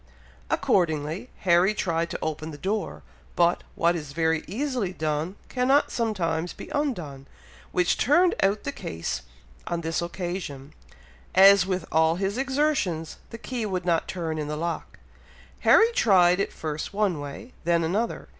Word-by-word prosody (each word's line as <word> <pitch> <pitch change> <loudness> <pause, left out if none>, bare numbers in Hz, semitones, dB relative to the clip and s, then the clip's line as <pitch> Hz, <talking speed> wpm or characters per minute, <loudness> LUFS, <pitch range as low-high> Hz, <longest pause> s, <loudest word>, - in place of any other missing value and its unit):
Accordingly, 160 - 0
Harry 180 +3 +4
tried 170 -4 -1
to - - -4
open 155 0 -3
the 150 - -8
door, 200 +5 -3 0.3
but, 175 0 +3
what 170 +1 +2
is 150 -4 -6
very 160 0 +1
easily 245 - -2
done 155 +2 -2
cannot 265 +3 +2
sometimes 175 -7 -1
be - - -10
undone, 175 - -3 0.4
which 180 -1 +2
turned 340 +8 +4
out 200 +2 +2
the 140 - -2
case 85 -10 -4 0.5
on 170 0 -2
this 165 0 -1
occasion, 175 -6 -5 0.6
as, 195 0 +7
with 185 -3 -2
all 160 +1 +3
his 195 +5 -2
exertions, 265 - 0
the 230 - -8
key 240 0 -4
would 185 -4 -2
not 170 -2 +1
turn 165 -4 -3
in 150 - -3
the 150 0 -3
lock! 165 0 -4 0.6
Harry 455 +1 +6
tried 180 - +4
it 200 - -1
first 155 +4 -5
one 200 -7 +1
way, 145 - -8
then 170 -1 +2
another. 205 +8 -1
175 Hz, 150 wpm, -26 LUFS, 160-210 Hz, 0.6 s, as